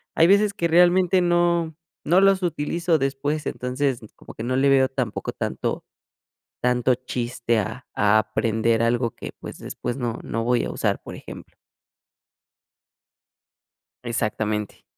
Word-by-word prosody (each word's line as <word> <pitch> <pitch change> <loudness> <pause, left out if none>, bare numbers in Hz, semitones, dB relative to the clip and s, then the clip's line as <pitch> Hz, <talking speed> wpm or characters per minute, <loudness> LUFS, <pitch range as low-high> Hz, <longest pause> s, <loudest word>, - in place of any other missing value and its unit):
hay 165 - +5
veces 200 +2 +4
que 170 -4 0
realmente 180 +2 +4
no 175 -2 +1 0.3
no 175 +4 +4
los 195 -1 +4
utilizo 170 +1 0
después, 145 +2 -2
entonces, 130 0 -1 0.2
como - - -13
que 110 - -7
no 130 +2 -1
le 135 +2 +3
veo 135 -1 +5
tampoco 130 -5 -3
tanto - - -3 0.8
tanto 125 +1 +2
chiste 120 -2 -2
a 110 +4 -4
a 105 +1 +4
aprender 110 +1 0
algo 120 0 +1
que, - - -7
pues, - - -8
después 120 +2 -5
no 120 -3 -3
no 115 - -3
voy 120 0 +2
a - - -4
usar, - - -1
por - - -9
ejemplo. - - -11 2.5
Exactamente. 110 -3 -2
130 Hz, 135 wpm, -23 LUFS, 115-170 Hz, 2.5 s, hay